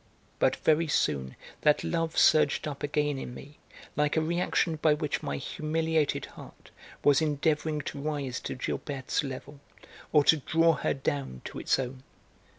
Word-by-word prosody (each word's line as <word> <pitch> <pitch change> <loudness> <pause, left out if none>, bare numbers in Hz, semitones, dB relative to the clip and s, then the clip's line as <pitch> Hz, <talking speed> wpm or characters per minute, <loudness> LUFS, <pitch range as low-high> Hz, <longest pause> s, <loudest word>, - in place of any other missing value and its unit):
But - - +3
very 160 +1 +2
soon 65 - 0 0.3
that 150 -1 +3
love 165 -1 -1
surged 155 0 +4
up 140 -2 -6
again 145 -1 0
in 125 - -7
me 145 +3 -12 0.4
like 150 +1 +1
a - - +4
reaction 170 0 0
by 150 0 +3
which 150 -1 -2
my 70 - -3
humiliated 160 - -1
heart - - -14 0.3
was 145 +1 +5
endeavouring 155 0 0
to 140 - -6
rise 140 -4 -3
to - - -5
Gilberte's 135 +1 -2
level, 140 +1 -7 0.5
or 150 -2 +5
to 160 - +5
draw 165 +3 +3
her - - -1
down 135 - -3
to - - -6
its - - +2
own. 130 0 -4
150 Hz, 155 wpm, -29 LUFS, 140-155 Hz, 0.5 s, was